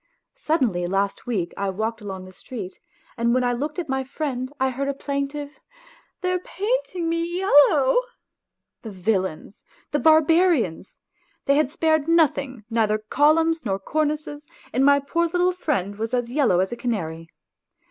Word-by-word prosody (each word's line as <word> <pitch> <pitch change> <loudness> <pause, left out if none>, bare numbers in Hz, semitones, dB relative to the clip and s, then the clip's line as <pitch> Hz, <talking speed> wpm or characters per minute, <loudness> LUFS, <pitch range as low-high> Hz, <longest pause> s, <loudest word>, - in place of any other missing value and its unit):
Suddenly 250 - 0
last 195 +5 -1
week 190 -8 -2
I 200 0 -2
walked 220 +4 -3
along 190 -2 -7
the 185 - -13
st 200 -3 -8
i - - -26 0.4
and 235 +1 +3
when 255 - +2
I 245 0 +1
looked 295 +7 -3
at 350 -3 -3
my 265 0 -1
friend. 265 -2 -4
I 265 0 +1
heard 275 +2 -3
a 280 - -1
plaintive, 280 +1 -4 0.3
" - - -29
They 365 -1 0
are 365 - 0
painting 385 -2 -2
me 335 0 0
yellow! 325 - +4 0.4
" - - -61
The 225 - -7
villains! 190 -2 -2 0.3
The 295 - +1
barbarians! 315 - +3 0.5
They 280 - +4
had 285 -2 +2
spared 315 -1 +1
nothing, 280 -7 +1
neither 220 -2 +1
columns, 310 +8 +2
nor 195 -4 -1
cornices, 300 +5 -2 0.3
and 260 - +2
my 280 0 +6
poor 335 +5 0
little 355 +2 +2
friend 255 - -2
was 225 +3 -2
as 245 -1 -2
yellow 250 -10 +3
as 190 - -1
a - - -3
canary. 165 -10 -4
275 Hz, 170 wpm, -23 LUFS, 215-315 Hz, 0.5 s, my